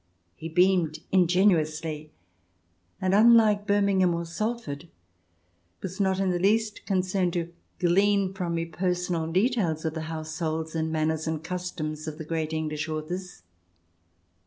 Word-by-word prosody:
He 165 Hz, -, -7 dB
beamed 180 Hz, -2 st, +3 dB
ingenuously, 165 Hz, -4 st, +2 dB, 0.9 s
and, 185 Hz, 0 st, 0 dB
unlike 215 Hz, -1 st, +5 dB
Birmingham 200 Hz, -3 st, +3 dB
or 170 Hz, 0 st, -3 dB
Salford, 175 Hz, -4 st, -4 dB, 1.0 s
was 190 Hz, 0 st, -5 dB
not 190 Hz, -1 st, +1 dB
in 190 Hz, -1 st, +1 dB
the 175 Hz, -, 0 dB
least 215 Hz, +3 st, +1 dB
concerned 185 Hz, -2 st, +1 dB
to 170 Hz, -1 st, -3 dB, 0.2 s
glean 195 Hz, +2 st, +2 dB
from 175 Hz, -3 st, -2 dB
me 165 Hz, 0 st, -1 dB
personal 175 Hz, -1 st, -1 dB
details 185 Hz, -, +1 dB
of 160 Hz, -, -1 dB
the 160 Hz, -, -4 dB
households 160 Hz, 0 st, -3 dB
and 160 Hz, -1 st, -1 dB
manners 160 Hz, 0 st, 0 dB
and 160 Hz, -1 st, -2 dB
customs 160 Hz, -4 st, -4 dB
of 155 Hz, 0 st, -6 dB
great 160 Hz, -1 st, -2 dB
English 155 Hz, -1 st, -2 dB
authors. 160 Hz, -, -5 dB
175 Hz, 130 wpm, -27 LUFS, 160-190 Hz, 1.0 s, unlike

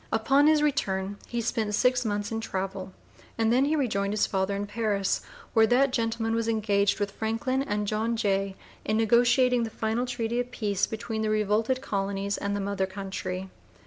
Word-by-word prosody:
Upon 275 Hz, +6 st, +4 dB
his 305 Hz, -1 st, +4 dB
return 200 Hz, -9 st, 0 dB
he 240 Hz, 0 st, -2 dB
spent 220 Hz, -2 st, -1 dB
six 250 Hz, +2 st, +2 dB
months 205 Hz, -1 st, -2 dB
in 225 Hz, 0 st, -2 dB
travel 190 Hz, -2 st, -4 dB, 0.5 s
and 225 Hz, 0 st, +2 dB
then 260 Hz, +3 st, +4 dB
he 305 Hz, +2 st, +1 dB
rejoined 205 Hz, -8 st, 0 dB
his 210 Hz, -, +2 dB
father 190 Hz, 0 st, -1 dB
in 200 Hz, +1 st, -2 dB
Paris, 205 Hz, -2 st, 0 dB, 0.3 s
where 220 Hz, -1 st, +5 dB
that 255 Hz, +3 st, +3 dB
gentleman 225 Hz, -1 st, 0 dB
was 230 Hz, 0 st, 0 dB
engaged 205 Hz, -3 st, +1 dB
with 205 Hz, -1 st, -1 dB
Franklin 225 Hz, +6 st, -1 dB
and 210 Hz, -5 st, -1 dB
John 220 Hz, +3 st, 0 dB
Jay 195 Hz, -2 st, 0 dB, 0.3 s
in 215 Hz, -, 0 dB
negotiating 240 Hz, +2 st, +4 dB
the 230 Hz, -, -2 dB
final 225 Hz, +3 st, -2 dB
treaty 240 Hz, -1 st, -2 dB
of 245 Hz, 0 st, -2 dB
peace 205 Hz, -5 st, -1 dB
between 220 Hz, 0 st, -4 dB
the 215 Hz, -, 0 dB
revolted 215 Hz, +4 st, +1 dB
colonies 200 Hz, -2 st, -2 dB
and 200 Hz, 0 st, -2 dB
the -, -, -2 dB
mother 195 Hz, -1 st, -1 dB
country. 190 Hz, -1 st, -5 dB
220 Hz, 180 wpm, -27 LUFS, 200-235 Hz, 0.5 s, where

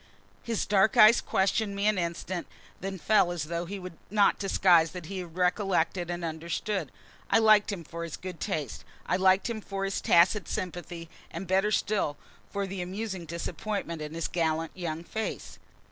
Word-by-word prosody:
His 230 Hz, -2 st, -2 dB
dark 205 Hz, +1 st, +3 dB
eyes 215 Hz, +3 st, +8 dB
questioned 200 Hz, +2 st, 0 dB
me 200 Hz, +1 st, -1 dB
an 215 Hz, -2 st, +3 dB
instant, 170 Hz, +1 st, -3 dB, 0.3 s
then 195 Hz, 0 st, -4 dB
fell 190 Hz, -1 st, +3 dB
as 175 Hz, -3 st, -3 dB
though 170 Hz, +2 st, -3 dB
he 200 Hz, +4 st, -5 dB
would 180 Hz, -3 st, -9 dB
not 205 Hz, 0 st, +3 dB
disguise 175 Hz, -5 st, +4 dB
that 180 Hz, -3 st, -7 dB
he 190 Hz, +2 st, -5 dB
recollected 180 Hz, 0 st, 0 dB
and 175 Hz, -1 st, -3 dB
understood. 165 Hz, +2 st, -3 dB, 0.4 s
I -, -, +5 dB
liked 215 Hz, -1 st, +5 dB
him 185 Hz, -4 st, -5 dB
for 170 Hz, +2 st, -7 dB
his 165 Hz, -2 st, -6 dB
good 180 Hz, -3 st, -7 dB
taste. 145 Hz, -9 st, -3 dB, 0.2 s
I -, -, +1 dB
liked 190 Hz, +1 st, +4 dB
him 230 Hz, -2 st, -4 dB
for 195 Hz, -1 st, -3 dB
his 195 Hz, -, -2 dB
tacit 180 Hz, +4 st, +4 dB
sympathy, 175 Hz, -3 st, -5 dB, 0.2 s
and 170 Hz, +4 st, -6 dB
better 190 Hz, +3 st, +2 dB
still 200 Hz, -8 st, 0 dB, 0.3 s
for 200 Hz, 0 st, -2 dB
the 190 Hz, -1 st, -5 dB
amusing 190 Hz, 0 st, -4 dB
disappointment 170 Hz, +1 st, -4 dB
in 150 Hz, +1 st, -6 dB
his 165 Hz, -, -2 dB
gallant, 160 Hz, -1 st, -1 dB
young 165 Hz, -3 st, -4 dB
face. 220 Hz, +5 st, -5 dB
185 Hz, 175 wpm, -28 LUFS, 170-200 Hz, 0.4 s, eyes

